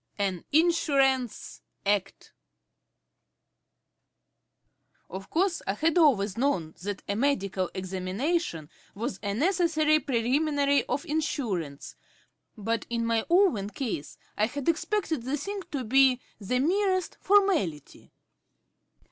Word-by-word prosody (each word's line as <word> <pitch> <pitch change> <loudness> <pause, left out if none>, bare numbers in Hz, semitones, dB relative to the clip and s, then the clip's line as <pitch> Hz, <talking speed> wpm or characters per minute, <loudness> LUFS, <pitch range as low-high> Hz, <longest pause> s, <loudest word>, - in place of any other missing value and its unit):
AN 190 -4 -1
INSURANCE 280 -6 +1 0.2
ACT 200 -1 -1 2.8
Of 195 +1 -7
course 355 +1 +1
I 195 - 0
had 320 +6 +1
always 220 - +3
known 180 - 0
that 200 +1 -5
a 200 - -1
medical 200 -8 0
examination 185 - -2 0.2
was 210 -2 -4
a 200 -1 -2
necessary 315 - +2
preliminary 280 +3 +1
to 255 - 0
insurance, 220 - -3 0.6
but 225 +1 -2
in 235 -1 -1
my 230 -1 +1
own 340 - +3
case 215 - -5 0.2
I 215 - +2
had 285 +2 -6
expected 335 - 0
the 265 +5 -2
thing 395 +7 -5
to 275 -3 -2
be 260 +2 +4 0.2
the 220 +5 -1
merest 370 +6 +1
formality. 370 - +1
255 Hz, 105 wpm, -27 LUFS, 200-315 Hz, 2.8 s, be